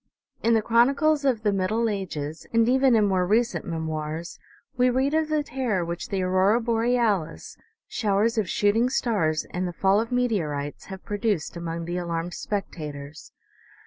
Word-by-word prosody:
In 230 0 +3
the 220 - +2
chronicles 280 +7 +3
of 240 -5 +1
the 205 -2 +2
middle 210 +5 0
ages, 165 -7 -4
and 230 0 +3
even 260 0 +4
in 215 -2 +4
more 190 -2 +2
recent 230 +4 +1
memoirs, 160 0 -4 0.4
we 250 0 +3
read 265 +3 +1
of 315 0 +1
the 305 -1 +1
terror 245 -11 -1
which 170 0 -5
the 190 -2 -1
aurora 190 +5 +3
borealis, 230 -6 0 0.3
showers 215 +1 +1
of 205 - -1
shooting 220 +4 +2
stars 195 -12 0
and 180 +1 -2
the 175 - -5
fall 195 +3 +3
of 230 - -5
meteorites 165 -13 -1
have 190 -1 -9
produced 205 -6 -1
among 170 -1 -4
the 175 +1 -3
alarmed 170 0 -3
spectators. 150 -7 -6
205 Hz, 160 wpm, -25 LUFS, 170-235 Hz, 0.4 s, even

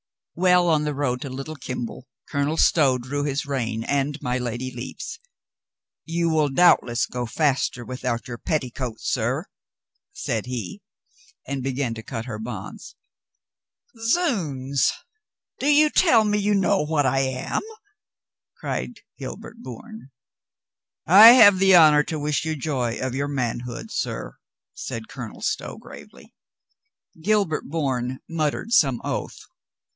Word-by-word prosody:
Well 180 0 +3
on 155 -2 +3
the 150 -1 -2
road 125 -3 -1
to 140 - -5
Little 135 +4 -7
Kimble, 125 -1 -6 0.2
Colonel 145 +2 -1
Stow 140 -7 +4
drew 135 +4 -4
his 145 0 -2
rein 115 -5 -2
and 140 +2 -1
my 125 -1 -2
Lady 125 +1 -4
Lepe's. 130 - -7 0.9
"You 170 +1 0
will 155 -2 +2
doubt 175 +6 +5
less 120 -1 -1
go 125 -1 -4
faster 130 -3 0
without 125 -1 -3
your 120 -2 -7
petticoats, 125 -6 -3
sir," 130 - -1 0.7
said 120 - -3
he, 125 - -5 0.6
and 140 -1 -4
began 130 -2 -2
to 110 - -7
cut 115 +1 -6
her 110 -4 -6
bonds. 110 -4 -8 1.0
"Zounds, 175 - 0 0.7
do 280 - -1
you 300 +1 +5
tell 320 -11 +5
me 210 0 +1
you 205 0 +1
know 195 0 +2
what 150 -1 0
I 135 +1 +2
am?" 130 -1 -1 1.0
cried - - -5 0.2
Gilbert - - -8
Bourne. 230 - -10 1.0
"I 210 +7 +10
have 205 -6 +7
the 190 -1 +6
honor 155 -3 +7
to 160 - -3
wish 145 -2 -1
you 160 0 -2
joy 130 -5 -2
of 130 -1 -3
your 140 +2 -1
man 130 -5 -2
hood, 125 - -7
sir," - - -4 0.4
said 430 - -6
Colonel - - -9
Stow - - -3
gravely. - - -14 0.9
Gilbert 195 -4 +1
Bourne 130 -5 -2
muttered 165 +6 -2
some 135 - +4
oath. - - -4
140 Hz, 140 wpm, -23 LUFS, 125-170 Hz, 1.0 s, I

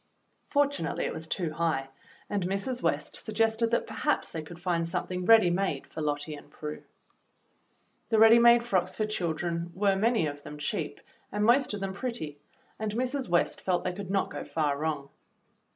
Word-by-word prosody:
'^" - - -43
Fortunately 285 - 0
it - - -2
was 160 0 -5
too 165 0 -2
high, 155 -4 0 0.4
and 200 -3 -1
Mrs. 200 +7 -2
West - - -1
sug 220 - -6
gested 225 +1 +2
that 235 - +1
perhaps 225 +7 -1
they 160 - -4
could 170 +2 -11
find 175 -2 0
something 180 +1 -3
ready 220 -6 +7
made 195 +2 -1
for 160 - -7
Lottie 145 0 -2
and 145 - -11
Prue. 150 0 -7 1.3
The 225 - +3
ready 225 +2 +8
made 235 0 +7
frocks 195 -7 0
for 215 - 0
children 170 -4 -2
were 195 0 +3
many 220 -2 +2
of 145 -1 -4
them 150 - -9
cheap 145 - -3 0.3
and 210 0 0
most 245 -1 +4
of 200 - -6
them 195 -1 -2
pretty; 195 - -5 0.4
and 215 -1 -2
Mrs. 255 0 -2
West 175 0 +1
felt 180 -2 0
they 180 - -1
could 190 0 -7
not 195 0 0
go - - -5
far 150 -3 0
wrong. 145 -2 -3
190 Hz, 185 wpm, -29 LUFS, 160-225 Hz, 1.3 s, ready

